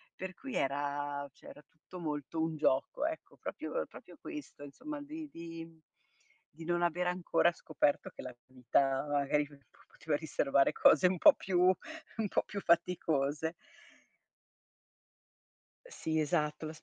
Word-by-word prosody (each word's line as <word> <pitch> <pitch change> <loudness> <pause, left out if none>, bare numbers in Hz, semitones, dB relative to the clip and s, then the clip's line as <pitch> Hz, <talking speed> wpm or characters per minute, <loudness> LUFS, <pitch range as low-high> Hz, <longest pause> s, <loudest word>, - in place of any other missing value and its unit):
per 185 0 -6
cui 270 +5 -8
era 145 0 -1
cioè - - -17
era 150 - -12
tutto 165 +3 -13
molto 150 -1 -3
un 160 0 0
gioco, 140 - +1
ecco. 320 0 -6
Proprio- - - -3
proprio - - -13
questo, 300 - -8
insomma, 290 - -7
di 305 +2 -7
di 165 -3 -7
mhmm, 165 -1 -18 0.7
di 160 +2 -10
non 175 +1 +1
aver 175 +1 +1
ancora 180 -1 +2
scoperto 155 -3 0
che - - -9
la 125 -1 -7
vita 135 +2 +1
magari 145 0 +2
p 145 0 -16 0.4
poteva 155 -2 0
riservare 140 -3 +2
cose 160 +4 +6
un 180 0 0
po' - - +9
più 185 -2 -1
un 220 - 0
po' - - +1
più 205 - -5
faticose. 160 -3 +1 2.3
Eh, - - -15
sì 160 - -1
esatto. 155 0 0
160 Hz, 145 wpm, -33 LUFS, 145-180 Hz, 2.3 s, po